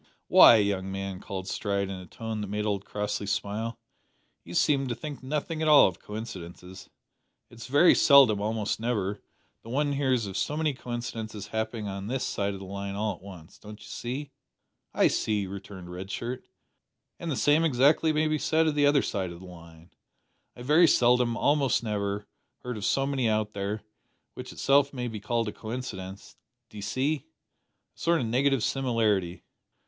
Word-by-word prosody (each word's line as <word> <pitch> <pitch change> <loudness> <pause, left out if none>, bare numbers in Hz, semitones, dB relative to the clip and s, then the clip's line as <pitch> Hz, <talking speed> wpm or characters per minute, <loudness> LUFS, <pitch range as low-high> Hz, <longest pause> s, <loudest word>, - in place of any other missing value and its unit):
"Why, - - +9
young 100 -3 0
man," 95 -1 -4
cried 95 -1 -6
Stride 100 0 -2
in 95 -1 -6
a 90 - -11
tone 110 +3 -5
that 105 - -4
made 105 +2 -2
old 100 -2 -1
Crossley 105 0 -3
smile, 105 +3 -2 0.7
"you - - -9
seem 135 -2 +2
to 120 - -2
think 150 +1 -7
nothing 150 +4 -3
at 160 - +1
all 150 -1 +8
of 90 - -5
coincidences. 95 -4 -9 0.6
It's 120 0 -10
very 145 +7 +6
seldom 135 -8 +6
almost 110 0 -1
never 105 -4 -2 0.4
that 115 - -12
one 145 +3 0
hears 130 -5 +1
of 100 -1 -5
so 150 +8 -1
many 155 -2 +1
coincidences 115 -4 -6
happening 110 -1 -3
on 100 0 -5
this 130 +2 -2
side 100 0 -2
o' - - -6
the 95 - -9
line 100 +1 -5
all 105 0 -1
at 90 - -15
once 90 -5 -12
don't 105 0 -11
you - - -13
see." 135 +4 -5 0.6
"I - - +4
see," 105 -2 0
returned 95 -2 -9
Red 95 +2 -7
Shirt; 120 +5 -4 0.8
"and 170 - -5
the 145 - -1
same, 150 +3 +3
exactly, 150 +2 +3
may 155 0 +1
be 155 0 0
said 160 +2 +2
of 155 - +1
the 145 -1 +3
other 145 -1 +4
side 95 -4 -2
o' 85 - -9
the 95 - -12
line. 85 -1 -14 0.6
I 120 - -10
very 155 +6 +5
seldom 125 -3 +3
almost 140 -4 +2
never 105 -1 -2 0.4
heard 125 -1 -4
of 105 -2 -4
so 135 - +2
many 135 -4 0
out 110 -1 0
there; 100 +2 -3 0.5
which - - -8
itself 140 +1 +2
may 125 -2 -3
be 110 -2 -5
called 115 +2 -1
a - - -2
coincidence, 105 -5 -7 0.3
d'ee 105 - -8
see? 135 +8 -1 0.7
a - - -23
sort 170 0 +2
of 125 - -1
negative 130 +2 +1
similarity." 115 -9 0
110 Hz, 185 wpm, -27 LUFS, 100-135 Hz, 0.8 s, Why